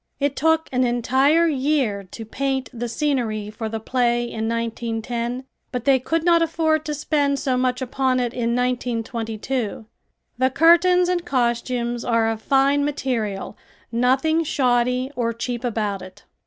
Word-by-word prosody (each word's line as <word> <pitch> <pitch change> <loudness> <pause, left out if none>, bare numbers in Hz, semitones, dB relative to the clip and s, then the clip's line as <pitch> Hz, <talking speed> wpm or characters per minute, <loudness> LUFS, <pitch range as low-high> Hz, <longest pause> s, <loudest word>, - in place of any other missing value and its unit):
It 280 -1 0
took 320 +2 +2
an 255 0 +2
entire 265 +7 +3
year 270 -8 0
to 225 +5 -9
paint 265 +3 -2
the 240 0 -4
scenery 230 -7 -1
for 220 +1 -5
the 225 0 -4
play 240 +1 +1
in 225 -2 -3
1910, 230 +2 -3 0.3
but 250 -2 -4
they 270 -2 +5
could 325 +6 -1
not 340 -1 +4
afford 320 -1 +1
to 300 - -2
spend 285 -1 0
so 265 -2 0
much 250 0 0
upon 260 0 0
it 245 -1 -1
in 235 -1 -1
1922. 235 -2 -2 0.5
The 260 0 +3
curtains 345 +5 +5
and 355 -1 0
costumes 240 -3 -1
are 230 -1 +2
of 220 -1 -5
fine 275 +3 +3
material, 240 -9 -2 0.4
nothing 265 +7 +2
shoddy 250 -2 +1
or 230 -1 -1
cheap 240 +1 -4
about 210 -5 -2
it. 185 +2 -13
250 Hz, 150 wpm, -22 LUFS, 230-280 Hz, 0.5 s, they